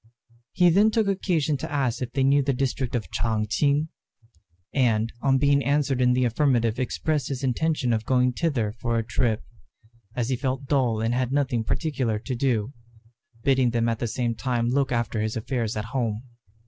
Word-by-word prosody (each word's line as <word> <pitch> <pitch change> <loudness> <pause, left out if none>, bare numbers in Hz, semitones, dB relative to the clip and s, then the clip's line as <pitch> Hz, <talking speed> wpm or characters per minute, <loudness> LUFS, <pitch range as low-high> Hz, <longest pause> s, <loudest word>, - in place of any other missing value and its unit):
He 175 -1 +4
then 205 +5 +5
took 220 0 +1
occasion 170 -6 0
to 130 - -6
ask 130 -5 -1
if 120 -2 -3
they 135 - +1
knew 140 +2 +4
the 140 0 0
district 130 -1 -2
of 115 - -3
Ch'ang 110 -2 0
ch'ing, 145 +7 +1 0.8
and 115 -4 +1
on 135 -1 +3
being 140 0 +3
answered 140 -2 +1
in 125 0 +4
the 125 0 +2
affirmative 120 -2 +1
expressed 145 +3 -1
his 135 -1 -4
intention 135 -1 0
of 110 -1 -1
going 125 +1 +2
thither 125 -9 0
for 115 +1 -2
a 115 - 0
trip, 115 -2 0 0.7
as 120 -1 -1
he 130 - +1
felt 130 +1 -3
dull 130 -6 +1
and 115 +1 0
had 125 0 0
nothing 135 -5 0
particular 130 -5 -1
to 130 +5 -5
do, 120 -1 0 0.7
bidding 130 -2 +3
them 115 0 0
at 115 -2 -1
the 120 - -1
same 120 +1 -1
time 120 +1 -1
look 135 +1 +1
after 120 -2 -1
his 110 +1 -2
affairs 115 -1 -2
at 105 - -3
home. 115 -4 -1
125 Hz, 185 wpm, -25 LUFS, 115-140 Hz, 0.8 s, then